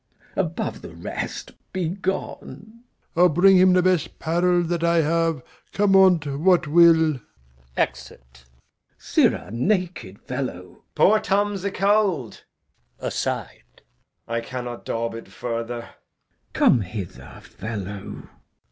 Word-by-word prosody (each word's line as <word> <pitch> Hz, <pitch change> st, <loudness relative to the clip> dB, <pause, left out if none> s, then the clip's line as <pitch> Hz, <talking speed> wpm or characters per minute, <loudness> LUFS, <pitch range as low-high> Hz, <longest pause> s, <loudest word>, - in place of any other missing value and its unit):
Above -, -, -2 dB
the -, -, -11 dB
rest, -, -, -5 dB, 0.2 s
be 185 Hz, -3 st, -2 dB
gone. 190 Hz, +1 st, -3 dB
Old -, -, -14 dB
Man. 220 Hz, +3 st, -14 dB, 0.3 s
I'll 180 Hz, +2 st, +5 dB
bring 185 Hz, +4 st, +5 dB
him 185 Hz, 0 st, +6 dB
the 180 Hz, 0 st, +3 dB
best 180 Hz, -4 st, +1 dB
'parel 175 Hz, +2 st, +1 dB
that 170 Hz, 0 st, -2 dB
I 170 Hz, 0 st, +3 dB
have, 165 Hz, -2 st, 0 dB, 0.3 s
Come 200 Hz, -1 st, +3 dB
on't 185 Hz, -5 st, +5 dB, 0.2 s
what 180 Hz, -1 st, +4 dB
will. 160 Hz, -2 st, +5 dB, 0.6 s
Exit. 65 Hz, 0 st, -3 dB
Glou. 60 Hz, 0 st, -34 dB, 0.4 s
Sirrah 90 Hz, -, +1 dB
naked 170 Hz, -, -2 dB
fellow -, -, -5 dB
Edg. -, -, -22 dB
Poor 215 Hz, +2 st, +5 dB
Tom's 205 Hz, -1 st, 0 dB
acold. 200 Hz, -, 0 dB, 0.5 s
[Aside] -, -, -3 dB, 0.6 s
I 115 Hz, 0 st, -2 dB
cannot 125 Hz, -1 st, -7 dB
daub 115 Hz, 0 st, -2 dB
it 115 Hz, -, -9 dB
further. 115 Hz, 0 st, -4 dB
Glou. 115 Hz, -, -22 dB
Come 120 Hz, -, +5 dB
hither, 95 Hz, -1 st, -8 dB
fellow. 100 Hz, -3 st, -7 dB
165 Hz, 125 wpm, -23 LUFS, 120-185 Hz, 0.6 s, him